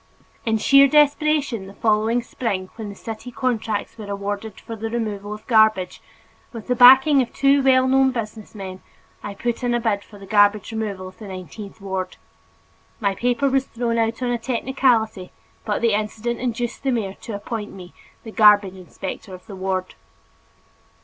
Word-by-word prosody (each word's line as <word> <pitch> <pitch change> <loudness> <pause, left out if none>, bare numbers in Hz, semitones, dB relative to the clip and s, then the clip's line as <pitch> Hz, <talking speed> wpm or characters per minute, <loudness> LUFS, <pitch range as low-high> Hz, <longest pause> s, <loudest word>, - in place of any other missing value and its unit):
In 220 0 +2
sheer 275 +5 +6
desperation, 290 -6 +2
the 195 - -12
following 220 +2 +1
spring 195 -6 -4
when 220 -2 -6
the 200 - -9
city 225 +4 -8
contracts 230 -3 -2
were 205 -2 -8
awarded 200 +2 -5
for 230 - -8
the 225 +1 -5
removal 210 -3 -4
of 210 +1 -8
garbage, 220 -5 +3 0.5
with 230 -3 -8
the 250 - 0
backing 265 +4 +7
of 245 - -3
two 275 0 +3
well 260 -1 +4
known 265 0 +4
business 220 -3 -6
men, 190 -2 -7 0.4
I 205 -1 -7
put 240 +4 -3
in 240 -1 +1
a - - +1
bid 215 -4 -1
for 210 - -15
the 200 - -12
garbage 205 +1 +3
removal 205 -4 -4
of 185 - -20
the 215 - -9
nineteenth 195 +3 -9
ward. 190 -2 -4 0.8
My 200 -3 0
paper 245 +6 0
was 270 0 +1
thrown 230 -1 -2
out 225 +2 -1
on 245 - 0
a 240 - -1
technicality 230 -5 0 0.3
but 210 +2 -2
the 230 -2 +3
incident 215 +3 -2
induced 240 -1 -3
the 275 - -1
mayor 215 -6 -2
to 225 - -6
appoint 210 +1 -5
me 180 -2 -12 0.3
the 220 - -9
garbage 210 -3 +5
inspector 190 +1 -8
of 180 - -16
the 200 - -9
ward. 185 -1 -3
220 Hz, 175 wpm, -22 LUFS, 200-245 Hz, 0.8 s, backing